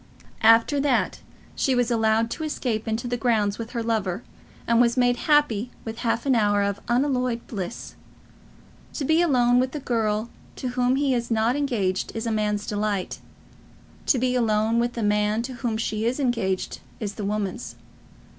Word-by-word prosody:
After 225 +6 +5
that 275 -2 +1 0.4
she 265 - +1
was 245 -1 +1
allowed 225 0 +2
to 315 - -4
escape 245 -8 -2
into 225 +2 -2
the 245 0 -1
grounds 220 -4 +1
with 230 0 -6
her 235 -2 -2
lover, 215 -3 -1 0.4
and 235 0 +4
was 235 +1 +2
made 245 -1 +3
happy 255 -7 +3 0.2
with 225 +1 -6
half 230 +1 -1
an 270 - +3
hour 205 -3 +3
of 200 0 -1
unalloyed 250 -1 0
bliss. 190 -6 -6 1.0
To 285 - -3
be 315 +4 +3
alone 250 -7 +4
with 255 0 0
the 300 - -3
girl 225 -3 -1 0.2
to 255 - -4
whom 250 +1 +1
he 275 -1 +1
is 235 -1 -1
not 225 +2 +2
engaged 225 -10 -1
is 225 +1 -3
a 230 - -1
man's 210 -1 0
delight; 205 -2 -2 0.9
to 270 - +4
be 250 +1 +1
alone 225 -1 +2
with 240 +1 0
the 230 - -3
man 210 +2 +1
to 255 +2 -6
whom 240 -3 -2
she 220 0 -1
is 255 +4 -1
engaged 230 -8 -1 0.2
is 205 -3 -4
the 210 - -6
woman's. 210 +3 -3
230 Hz, 175 wpm, -24 LUFS, 215-250 Hz, 1.0 s, After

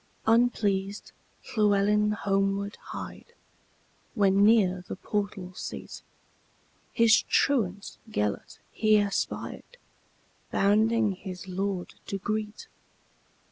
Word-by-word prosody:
Unpleased 210 -4 +1 0.4
Llewelyn 210 0 +3
homeward 195 0 -1
hied, 470 - -8 0.8
When, 200 -2 +4
near 195 -5 +4
the - - -5
portal 200 -2 -4
seat, - - -7 0.9
His 225 -1 +5
truant 205 -8 0
Gêlert 105 - -2
he 215 -1 +3
espied, 205 - -3 0.7
Bounding 215 +2 +3
his 185 0 -8
lord 190 0 -3
to 195 - -3
greet. 210 +2 -4
205 Hz, 85 wpm, -27 LUFS, 195-215 Hz, 0.9 s, His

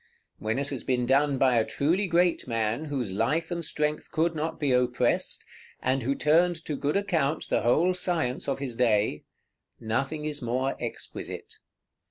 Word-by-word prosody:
When 110 +4 -1
it 140 +1 0
has 135 -4 -3
been 125 -2 0
done 140 +2 +3
by 130 -2 +4
a - - +3
truly 170 - 0
great 175 -2 +2
man, 115 +4 -1
whose 130 -9 -3
life 155 - 0
and 170 -1 -2
strength 150 -1 -1
could 165 +2 +1
not 160 +1 -3
be 145 -4 +1
oppressed, 125 -1 +1 0.3
and 130 +1 0
who 135 +4 0
turned 170 +5 +3
to 150 - -2
good 145 +5 0
account 160 -7 0
the - - +2
whole 165 +10 +3
science 170 -8 -1
of 135 - 0
his 135 -4 -5
day, 110 -9 +1 0.5
nothing 135 +7 -2
is 150 -1 -1
more 130 +3 -1
exquisite. 120 - -7
140 Hz, 170 wpm, -27 LUFS, 125-160 Hz, 0.5 s, by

